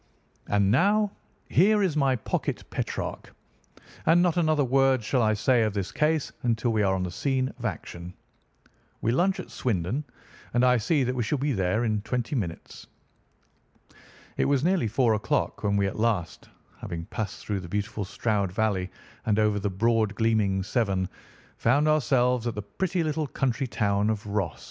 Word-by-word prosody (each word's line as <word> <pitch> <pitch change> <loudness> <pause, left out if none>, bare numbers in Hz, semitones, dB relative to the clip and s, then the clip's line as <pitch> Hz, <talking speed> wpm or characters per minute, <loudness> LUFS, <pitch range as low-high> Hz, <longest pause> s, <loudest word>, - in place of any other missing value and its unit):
And 100 -1 +2
now 205 - +3 0.4
here 205 +3 +4
is 180 -6 0
my 135 -3 +3
pocket 115 - -3
Petrarch, - - -4 0.7
and 165 +2 +6
not 175 -3 +2
another 155 -4 +2
word 135 -1 +3
shall 125 +3 +1
I 110 -1 +3
say 120 +3 +3
of 110 -2 0
this 100 -2 -2
case 155 -1 +1
until 115 0 0
we 110 - +2
are 95 -2 +2
on 95 - -1
the 90 - -3
scene 130 +6 -1
of 120 - -6
action. 90 -3 -5 0.9
We 115 - +1
lunch 185 +9 +2
at - - -8
Swindon, 110 - -1 0.5
and 120 +1 +4
I 125 0 +5
see 135 +6 +1
that 125 0 -1
we 125 - -2
shall 115 +6 0
be 140 +1 0
there 95 +2 0
in 110 -3 0
twenty 120 +3 -3
minutes." 90 -9 -5 1.5
It - - +2
was 140 -1 +2
nearly 175 -8 +2
four 115 +1 +2
o'clock 105 -1 -1
when 100 -1 +1
we 100 - +2
at 95 - -3
last, 105 -8 -1 0.3
after 85 - -5
passing 105 -2 -4
through 100 -2 -1
the 90 -2 -9
beautiful 105 +2 -2
Stroud 100 -1 -1
Valley, 95 -2 0 0.4
and 105 -1 +2
over 105 -1 +2
the 100 +1 -1
broad 110 +1 +1
gleaming 105 -4 +1
Severn, 95 -3 0 0.5
found 140 +6 +3
ourselves 125 -5 +2
at 120 - -2
the 105 - -4
pretty 180 - -2
little 155 -1 -1
country 135 0 -1
town 100 -2 +1
of 110 0 -2
Ross. 100 -3 -2
115 Hz, 175 wpm, -26 LUFS, 100-135 Hz, 1.5 s, and